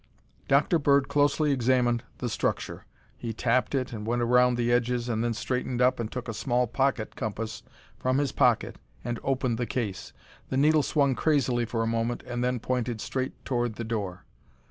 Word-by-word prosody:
Dr. 145 Hz, +5 st, +3 dB
Bird 140 Hz, -2 st, +3 dB
closely 145 Hz, +1 st, +2 dB
examined 125 Hz, -2 st, +2 dB, 0.2 s
the 125 Hz, -, -3 dB
structure. 110 Hz, -, -2 dB, 0.3 s
He 115 Hz, +9 st, -5 dB
tapped 125 Hz, +5 st, +1 dB
it 130 Hz, -1 st, -1 dB
and 105 Hz, -2 st, -5 dB
went 120 Hz, +2 st, 0 dB
around 125 Hz, +1 st, +4 dB
the 120 Hz, 0 st, +1 dB
edges 120 Hz, 0 st, +1 dB
and 115 Hz, -1 st, 0 dB
then 120 Hz, -1 st, 0 dB
straightened 125 Hz, +1 st, -2 dB
up 125 Hz, 0 st, +3 dB
and 115 Hz, -2 st, -3 dB
took 125 Hz, -1 st, -5 dB
a 115 Hz, -, -3 dB
small 120 Hz, +3 st, +1 dB
pocket 125 Hz, -1 st, -1 dB
compass 110 Hz, 0 st, -4 dB, 0.4 s
from 130 Hz, +1 st, +1 dB
his 140 Hz, -2 st, +1 dB
pocket -, -, +2 dB, 0.3 s
and 120 Hz, 0 st, -3 dB
opened 130 Hz, -3 st, 0 dB
the 120 Hz, -, -1 dB
case. 105 Hz, -8 st, -3 dB, 0.4 s
The 130 Hz, -, -1 dB
needle 155 Hz, +2 st, +5 dB
swung 140 Hz, -2 st, +2 dB
crazily 130 Hz, -5 st, +1 dB
for 115 Hz, 0 st, -1 dB
a -, -, 0 dB
moment 115 Hz, +1 st, -1 dB
and 120 Hz, 0 st, -3 dB
then 125 Hz, 0 st, 0 dB
pointed 125 Hz, -1 st, -2 dB
straight 130 Hz, +4 st, -4 dB
toward 120 Hz, -3 st, -1 dB
the 115 Hz, -, -4 dB
door. 100 Hz, -5 st, -4 dB
120 Hz, 185 wpm, -27 LUFS, 115-130 Hz, 0.4 s, needle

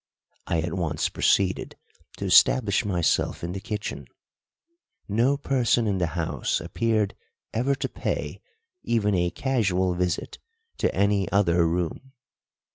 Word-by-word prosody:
I 85 Hz, -1 st, +1 dB
at 80 Hz, 0 st, -3 dB
once 80 Hz, -5 st, -1 dB
proceeded 95 Hz, -2 st, +1 dB, 0.4 s
to -, -, -4 dB
establish 110 Hz, -6 st, +4 dB
myself 90 Hz, -6 st, 0 dB
in 85 Hz, -, -3 dB
the 95 Hz, -, -4 dB
kitchen. 105 Hz, 0 st, -5 dB, 1.0 s
No 120 Hz, +7 st, +2 dB
person 125 Hz, -4 st, +1 dB
inthe 95 Hz, -4 st, 0 dB
house 75 Hz, -, -2 dB
appeared 105 Hz, +4 st, 0 dB, 0.4 s
ever 125 Hz, +5 st, +1 dB
to -, -, -3 dB
pay -, -, -4 dB, 0.4 s
even 105 Hz, -3 st, +1 dB
a 90 Hz, -1 st, +1 dB
casual 95 Hz, -8 st, 0 dB
visit 90 Hz, 0 st, -2 dB, 0.4 s
to -, -, +2 dB
any 100 Hz, 0 st, +1 dB
other 85 Hz, -4 st, +3 dB
room. 90 Hz, +10 st, -3 dB
100 Hz, 120 wpm, -25 LUFS, 90-115 Hz, 1.0 s, establish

